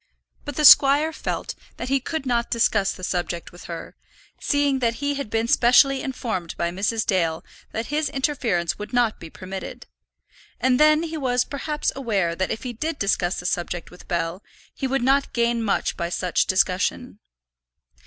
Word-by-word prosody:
But 290 - -6
the 300 - +2
squire 290 +3 +7
felt - - -4 0.2
that 245 - -5
he 275 0 +2
could 315 +2 -4
not 235 -2 0
discuss 210 -4 +2
the 185 - -10
subject 175 -1 -3
with 175 - -13
her, 170 -1 -8 0.4
seeing 285 -2 +1
that 235 -2 0
he 285 +2 -1
had 280 -5 -5
been 225 +1 0
specially 260 +3 +5
informed 225 -10 -4
by 170 0 -1
Mrs. 210 +5 -1
Dale 165 -5 0 0.3
that 225 - -3
his 300 -1 +1
interference 250 - -1
would 210 +4 -7
not 240 -3 +1
be 165 - -9
permitted; 190 +3 -8 0.7
and 255 -1 +2
then 305 +1 +5
he 325 -1 -4
was 250 -3 +1
perhaps 295 +2 -2
aware 205 -10 0
that 185 +1 -1
if - - -4
he 250 -2 -4
did 310 +7 -3
discuss 190 -2 0
the 175 - -9
subject 175 -1 -3
with 180 - -15
Bell, 170 +1 -2 0.3
he 265 - -3
would 265 -1 0
not 275 +2 +2
gain 235 0 +1
much 210 -3 0
by 170 - -3
such 180 0 0
discussion. 190 +5 0
235 Hz, 175 wpm, -23 LUFS, 185-275 Hz, 0.7 s, squire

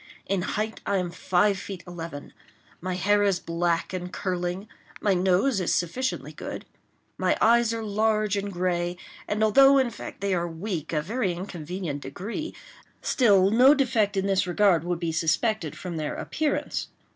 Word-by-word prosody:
In 195 -2 0
height 215 +4 -3
I 200 - 0
am 180 -2 -2
five 190 +3 +1
feet 195 -3 -7
eleven. 165 -5 -8 0.5
My 185 +1 -2
hair 205 +2 +2
is 200 -3 +2
black 170 +1 -1
and 180 -1 -4
curling. 180 +1 -3 0.3
My 205 - +2
nose 190 +5 +2
is 175 - +1
sufficiently 250 +10 -2
good. - - -7 0.5
My - - +2
eyes 235 0 +4
are 230 -1 -3
large 215 0 +1
and 200 0 -2
gray; 175 -1 -1 0.3
and 210 +1 0
although, 270 +6 +6
in 260 -3 +2
fact - - -9
they 200 -1 0
are 175 -1 0
weak 165 -1 -4
to 160 - -2
a - - +2
very 210 0 -1
inconvenient 175 -3 -5
degree, 210 - -5 0.5
still 200 -6 +4
no 255 +6 +7
defect 230 -7 +1
in 195 - +1
this 195 -2 +1
regard 180 -2 +3
would 175 -1 -2
be 170 -2 -1
suspected 165 - 0
from 175 -3 -5
their 155 -1 -3
appearance. 305 -1 -2
190 Hz, 170 wpm, -26 LUFS, 175-215 Hz, 0.5 s, no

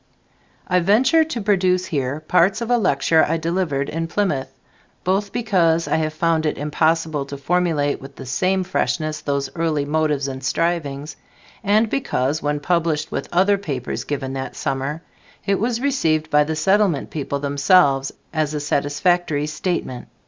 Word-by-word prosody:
I 180 0 +3
venture 245 - +4
to 250 -7 -4
produce 185 -3 +2
here 140 -1 -2
parts 180 +6 +2
of 235 +1 -2
a 245 - +5
lecture 160 -3 +3
I 165 - +1
delivered 165 -4 -1
in 165 +1 -3
Plymouth, 155 -8 -1 0.5
both 195 +2 0
because 180 -9 +1
I - - +1
have 155 -1 -2
found 160 -1 +1
it - - -2
impossible 155 0 0
to 140 - -6
formulate 155 -1 0
with 135 0 -11
the 135 - -9
same 185 +8 0
freshness 155 -4 -1
those 140 -2 -2
early 160 -4 0
motives 150 -2 0
and 130 -1 -6
strivings, 150 -2 -2 0.5
and 215 +2 +3
because, 155 - -1
when 145 0 -1
published 160 -1 0
with - - -4
other 195 +3 +3
papers 135 -10 -4
given 135 -2 -4
that 135 0 -5
summer, 135 +4 -3 0.4
it 200 -1 +1
was 230 +2 0
received 160 - 0
by 150 0 +4
the 160 +1 -2
Settlement 190 0 +1
people 140 -2 -3
themselves 140 -1 +3 0.2
as 155 -2 -1
a - - -1
satisfactory 145 +2 0
statement. 150 -5 -3
160 Hz, 155 wpm, -21 LUFS, 145-185 Hz, 0.5 s, a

